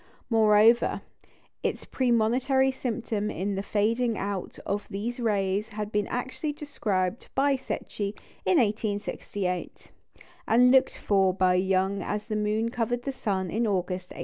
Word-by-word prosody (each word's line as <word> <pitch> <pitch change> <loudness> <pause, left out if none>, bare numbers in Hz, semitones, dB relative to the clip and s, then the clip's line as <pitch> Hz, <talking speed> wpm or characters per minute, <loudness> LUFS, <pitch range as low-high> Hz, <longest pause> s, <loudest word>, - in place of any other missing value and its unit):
Moreover, 220 +1 +5 0.6
its - - -2
premonitory 255 +2 +2
symptom 230 -5 -2
in 200 +2 -2
the 195 - -2
fading 225 +3 0
out 195 -2 -4
of 205 +1 -2
these 220 +5 -4
rays 205 -2 0
had 210 0 -5
been 210 -1 0
actually 260 +5 -3
described 210 -9 -2
by 275 +1 +3
Secchi 210 -5 -4 0.3
in 370 - +3
1868, 205 - -2 0.6
and 250 0 +5
looked 265 0 +4
for 190 -2 +2
by 185 -1 +3
Young 190 +1 +1
as 210 +3 -3
the 215 - -3
moon 215 +2 0
covered 245 +1 -2
the 275 - -2
sun 190 -8 -2
in 230 +2 0
August 180 -2 -2
1869. - - -10
210 Hz, 140 wpm, -27 LUFS, 195-240 Hz, 0.6 s, Moreover